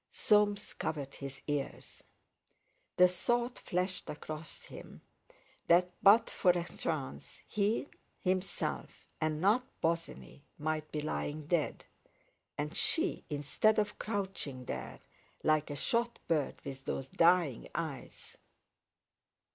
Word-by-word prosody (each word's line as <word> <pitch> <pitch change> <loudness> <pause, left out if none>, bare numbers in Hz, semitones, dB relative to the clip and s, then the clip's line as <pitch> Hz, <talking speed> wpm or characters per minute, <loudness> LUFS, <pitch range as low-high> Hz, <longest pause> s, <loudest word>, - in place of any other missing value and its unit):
Soames 210 -1 +3
covered 140 -3 -3
his 140 -1 -7
ears. 145 -2 -4 0.9
The 180 0 +9
thought 240 +7 0
flashed 185 +1 -2
across 155 +1 -7
him - - -11 0.7
that 180 +1 +5
but 220 +3 +7
for 185 - +1
a 175 -1 +4
chance, 70 - -4
he 210 +6 +1 0.3
himself, 185 +1 -2 0.2
and 155 -1 +1
not 210 +8 +4 0.2
Bosinney, 165 - -2 0.2
might 155 0 -2
be 150 - -2
lying 150 0 -3
dead, 160 -1 0 0.7
and 150 +3 -3
she, 340 +3 +1
instead 150 +9 +2
of 210 -1 0
crouching 190 - -3
there 65 - -5 0.4
like 155 -1 +3
a 145 - -3
shot 235 - 0
bird 155 -4 +1
with 135 -1 -6
those 135 - -2
dying 170 -7 +3
eyes.... 155 -5 -5
165 Hz, 115 wpm, -33 LUFS, 145-200 Hz, 0.9 s, The